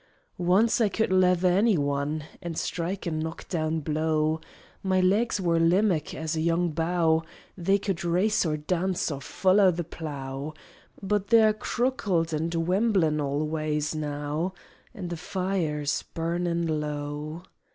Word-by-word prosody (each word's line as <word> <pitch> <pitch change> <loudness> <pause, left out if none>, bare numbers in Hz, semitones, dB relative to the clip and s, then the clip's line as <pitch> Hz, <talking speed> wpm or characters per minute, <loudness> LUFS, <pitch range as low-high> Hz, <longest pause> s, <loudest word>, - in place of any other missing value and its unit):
Once 195 +7 +3
I 215 - +4
could 220 -1 0
lether 180 -1 +4
anyone 155 -7 +1 0.2
An' 170 -1 -5
strike 180 +5 -3
a 170 - -1
knock 160 +1 -4
down 160 -2 -1
blow: 155 +1 0 0.4
My 190 -1 +1
legs 205 +5 +2
were 170 -3 +2
limmack 170 -1 +2
as 160 +1 -3
a 160 - -1
young 170 +1 +1
bough, 165 0 +2 0.3
They 195 +2 +2
could 195 -4 -3
race 180 +5 +2
or 155 -3 0
dance 180 +3 -1
or 140 -1 -5
foller 190 +6 +4
the 175 0 -3
plough; 145 -2 -6 0.5
But 200 0 0
they're 220 -1 +6
crookled 210 -8 0
and 160 +2 -1
wemblin' 170 -2 +2
all 145 +2 -1
waays 155 -1 -1
now, 150 +4 -3 0.4
An' 180 -3 -5
the 170 - -4
fire's 175 -5 -1
burnin' 170 +1 -2
low. 150 +2 -4
170 Hz, 140 wpm, -27 LUFS, 155-185 Hz, 0.5 s, they're